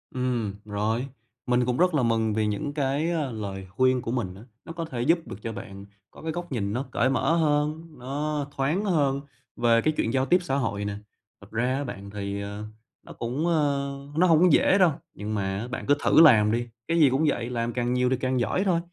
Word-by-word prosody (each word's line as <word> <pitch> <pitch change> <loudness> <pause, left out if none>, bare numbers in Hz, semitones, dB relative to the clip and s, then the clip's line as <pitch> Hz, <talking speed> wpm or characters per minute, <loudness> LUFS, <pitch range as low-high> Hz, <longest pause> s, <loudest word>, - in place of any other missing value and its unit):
Ừm, 125 -5 -1
rồi. 110 +5 -1 0.4
Mình 125 0 +2
cũng 125 0 0
rất 180 0 +3
là 145 -4 +2
mừng 115 -2 +1
vì 110 0 +1
những 145 +7 -2
cái, 145 +3 0
à, 150 -6 -1
lời 100 -4 -5
khuyên 130 +5 +2
của 115 - -4
mình 95 -8 -2
á, 100 - -12 0.2
nó 165 - -7
có 165 -1 -4
thể 125 -6 -5
giúp 165 +7 +3
được - - -6
cho 115 - -4
bạn 100 -1 -9 0.3
có - - -14
cái 160 - -3
góc 175 0 -6
nhìn 105 -5 -2
nó 130 +4 -2
cởi 130 - +2
mở 150 +5 +2
hơn, 150 0 +1
nó 145 +3 -3
thoáng 155 +10 0
hơn 140 -7 +1 0.3
về 115 -1 +3
cái 155 - +1
chuyện 115 - 0
giao 130 -1 +2
tiếp 175 +7 +4
xã 135 -6 -1
hội 105 -7 -1
nè. 100 - -3 0.5
Thật - - -15
ra 125 +3 0
á 140 - -2
bạn, 100 -6 -7
thì, 100 0 -4
ờ, 100 +1 -6 0.4
nó - - -11
cũng, 130 +8 -2
ơ 145 -4 +1 0.3
nó 180 +2 +5
hông 165 -3 +5
có 180 - +7
dễ 190 - +5
đâu. 185 -4 +5 0.2
Nhưng 105 +1 -5
mà 100 +3 -2
bạn 125 - -5
cứ 145 - +4
thử - - +6
làm 110 -9 +7
đi, 120 +1 -1 0.2
cái 165 0 +1
gì 145 -4 +6
cũng 135 +5 +1
vậy, 120 -4 -1
làm 120 -1 -2
càng 120 0 0
nhiều 125 0 +2
thì 130 - +1
càng 130 0 0
giỏi 120 - 0
thôi, 175 -4 +2
130 Hz, 235 wpm, -26 LUFS, 110-150 Hz, 0.5 s, có